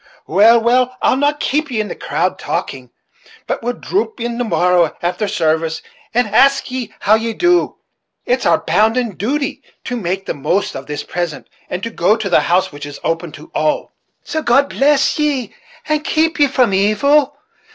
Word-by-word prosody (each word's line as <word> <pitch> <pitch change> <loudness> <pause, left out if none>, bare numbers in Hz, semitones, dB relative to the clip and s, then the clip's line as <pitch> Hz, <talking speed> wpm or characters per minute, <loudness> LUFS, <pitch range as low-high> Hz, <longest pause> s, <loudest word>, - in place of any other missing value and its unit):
Well, 220 +7 +5
well, 250 +2 +1
I'll - - +4
not 290 +2 +1
keep 300 +2 -1
ye 235 -4 -2
in 215 - -1
the - - -5
cowld, - - -2
talking, - - -4 0.6
but - - -3
will 240 +1 -2
drop 410 - -3
in 235 0 -3
the - - +1
morrow 180 -6 +2
after 180 +5 -1
sarvice, 160 -4 -1 0.3
and 245 +1 +2
ask 275 +5 +3
ye 250 -4 -4
how 205 - +3
ye 225 +1 +1
do. 350 +6 +2 0.5
It's 250 +1 0
our 165 - +4
bounden 220 +9 +1
duty 270 +7 -2 0.2
to 250 - -4
make 190 -3 -3
the - - -2
most 175 +8 -1
of 135 0 -7
this 150 -1 -4
present, 175 -3 -4 0.2
and 180 +2 -4
to 230 - -3
go 205 +1 +2
to 205 -4 -4
the - - +5
house 185 +2 +1
which 145 0 -8
is 145 - -9
open 165 0 -2
to 155 - -13
all; 155 0 -1 0.3
so 315 - -3
God 275 +1 +3
bless 290 +2 +2
ye, 280 -7 -1 0.3
and 305 -1 0
keep 320 0 0
ye 290 - +5
from 250 -6 +2
evil! 280 +9 +2
230 Hz, 185 wpm, -17 LUFS, 180-275 Hz, 0.6 s, Well